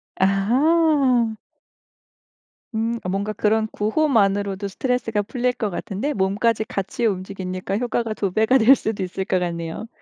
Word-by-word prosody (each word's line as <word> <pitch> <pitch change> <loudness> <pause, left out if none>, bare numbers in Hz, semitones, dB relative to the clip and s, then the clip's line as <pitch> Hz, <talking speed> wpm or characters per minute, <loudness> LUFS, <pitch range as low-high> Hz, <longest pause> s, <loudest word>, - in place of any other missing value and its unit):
아하. 250 - +3 1.4
음. 230 +1 -1
어 180 - -3
뭔가 200 +3 -2
그런 220 +1 +1
구호만으로도 205 -5 +1
스트레스가 230 0 -1
풀릴 250 +3 -1
것 215 -4 -2
같은데 205 +10 -3
몸까지 210 +4 +1
같이 205 +3 -3
움직이니까 185 -1 -3
효과가 235 -2 -1
2 195 -3 -2
배가 220 +6 +3
될 260 +4 +7
수도 210 -5 -3
있을 185 +1 -4
것 185 -3 +1
같네요. 170 +4 -4
215 Hz, 295 characters per minute, -22 LUFS, 195-240 Hz, 1.4 s, 될